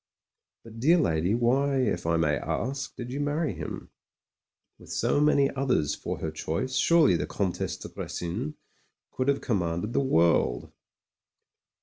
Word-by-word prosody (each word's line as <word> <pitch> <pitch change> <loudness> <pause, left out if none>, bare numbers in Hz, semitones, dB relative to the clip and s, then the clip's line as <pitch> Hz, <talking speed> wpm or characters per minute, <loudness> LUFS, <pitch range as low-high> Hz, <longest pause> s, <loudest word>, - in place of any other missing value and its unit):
"But, 115 0 -11
dear 160 +9 +5
lady, 90 - +1
why, 135 +4 +2
if 105 -10 0
I 85 0 +2
may 75 -3 +2
ask, 135 - -3
did 125 0 -6
you 140 - -3
marry 145 +1 -1
him? - - -7 0.9
With - - -13
so 145 - +1
many 145 -2 +4
others 130 - 0
for - - -4
her 80 - -4
choice, 80 +11 -3
surely 165 - +4
the 75 -2 -2
Comtesse 95 +3 -2
de - - -8
Grecin 110 - -5 0.6
could 130 - -2
have 140 0 +2
commanded 95 -2 -1
the - - +2
world?" 85 - +2
120 Hz, 145 wpm, -27 LUFS, 85-140 Hz, 0.9 s, dear